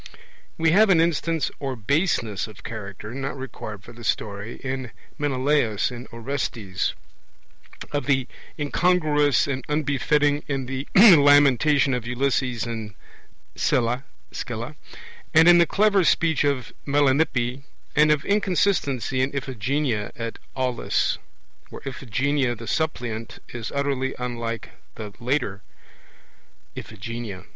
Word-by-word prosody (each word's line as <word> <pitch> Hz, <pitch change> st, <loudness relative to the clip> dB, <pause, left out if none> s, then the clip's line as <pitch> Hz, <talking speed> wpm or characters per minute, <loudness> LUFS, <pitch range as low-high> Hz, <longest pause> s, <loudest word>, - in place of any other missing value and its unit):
We 165 Hz, 0 st, +3 dB
have 210 Hz, +4 st, +5 dB
an 180 Hz, -4 st, +5 dB
instance 165 Hz, -2 st, +1 dB
of 130 Hz, -6 st, -5 dB
baseness 135 Hz, -, +1 dB
of 110 Hz, -2 st, -14 dB
character, 105 Hz, -1 st, -7 dB
not 135 Hz, +1 st, -4 dB
required 110 Hz, -6 st, -7 dB
for 120 Hz, -, -12 dB
the 120 Hz, 0 st, -12 dB
story, 105 Hz, 0 st, -2 dB
in 135 Hz, 0 st, -2 dB
the 125 Hz, -, -9 dB, 0.3 s
Menelaus 135 Hz, -6 st, +1 dB
in 125 Hz, +1 st, -8 dB
Orestes; 115 Hz, -6 st, -3 dB, 1.0 s
of 145 Hz, -1 st, -2 dB
the 135 Hz, -3 st, +2 dB, 0.3 s
incongruous 150 Hz, -3 st, +2 dB
and 135 Hz, -2 st, -3 dB
unbefitting 145 Hz, 0 st, +1 dB
in 135 Hz, -2 st, -2 dB
the 130 Hz, +2 st, -4 dB
lamentation 145 Hz, -, +6 dB
of 125 Hz, -2 st, -3 dB
Ulysses 125 Hz, -1 st, 0 dB
in 110 Hz, -4 st, -6 dB, 0.6 s
Scylla, 125 Hz, +2 st, +1 dB, 1.3 s
and 160 Hz, +1 st, +7 dB
in 175 Hz, 0 st, +8 dB
the 170 Hz, -, +5 dB
(clever) 205 Hz, -2 st, +3 dB
speech 160 Hz, -2 st, +2 dB
of 140 Hz, -4 st, -1 dB
Melanippe; 140 Hz, -3 st, +1 dB, 0.3 s
and 150 Hz, +1 st, +5 dB
of 150 Hz, 0 st, +1 dB
inconsistency 180 Hz, -, +1 dB
in 130 Hz, -, +1 dB
Iphigenia 130 Hz, -3 st, -1 dB
at 115 Hz, -1 st, -5 dB, 0.2 s
Aulis, 130 Hz, -2 st, 0 dB, 0.5 s
where -, -, -10 dB
Iphigenia 135 Hz, +1 st, -1 dB
the 115 Hz, +1 st, -9 dB
suppliant 115 Hz, -5 st, -3 dB
is 115 Hz, -2 st, -6 dB
utterly 140 Hz, -2 st, -1 dB
unlike 120 Hz, -2 st, -4 dB, 0.3 s
the 105 Hz, -2 st, -7 dB
later 120 Hz, -5 st, -1 dB, 1.1 s
Iphigenia. 110 Hz, -2 st, -7 dB
135 Hz, 120 wpm, -24 LUFS, 115-145 Hz, 1.3 s, in